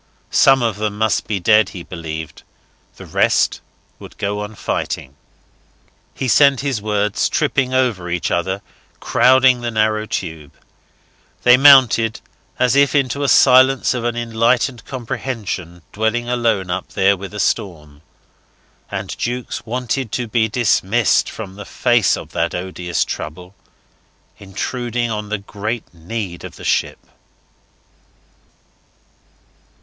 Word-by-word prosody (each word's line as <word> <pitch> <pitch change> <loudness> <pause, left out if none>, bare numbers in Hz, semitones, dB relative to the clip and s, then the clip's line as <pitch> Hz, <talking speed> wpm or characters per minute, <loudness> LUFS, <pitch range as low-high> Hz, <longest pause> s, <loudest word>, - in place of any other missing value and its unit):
Some 135 -2 +5
of 115 -4 -1
them 105 -1 -3
must 110 -4 0
be 105 -3 -1
dead, 105 +2 +4
he 90 - -9
believed. 80 -3 -7 0.5
The - - -11
rest - - +1 0.4
would - - -13
go 100 +1 -2
on 105 +1 -6
fighting.... 65 -8 -4 1.0
He 130 - -3
sent 140 +1 +4
up - - -10
his 135 -7 -2
words, 105 -1 0
tripping 130 -1 0
over 120 -9 0
each 85 0 -2
other, 95 +3 -1 0.4
crowding 130 -1 +4
the 120 - -2
narrow 110 -1 0
tube. 80 -7 -5 0.9
They 125 0 +7
mounted 125 -5 +5 0.4
as 125 +1 +2
if 140 +1 +3
into 140 0 0
a 140 - +1
silence 130 0 +5
of 125 -2 -3
an 120 0 -1
enlightened 115 +1 0
comprehension 110 - -5
dwelling 110 +3 -1
alone 115 -7 0
up 95 +1 -4
there 100 +1 +3
with 100 +1 -8
a - - -5
storm. 75 -10 -2 0.9
And - - -5
Jukes 120 0 -4
wanted 125 0 -3
to 125 -2 -2
be 110 0 +1
dismissed 110 0 +1
from 100 -4 -8
the 100 +1 -9
face 120 -4 +2
of - - -10
that 85 0 -1
odious 90 -1 -2
trouble 90 +4 -7 0.9
intruding 120 +4 -3
on 105 -1 -4
the 110 - -1
great 105 +3 -6
need 90 +1 -6
of - - -9
the - - -12
ship. - - 0
110 Hz, 135 wpm, -18 LUFS, 95-125 Hz, 1.0 s, They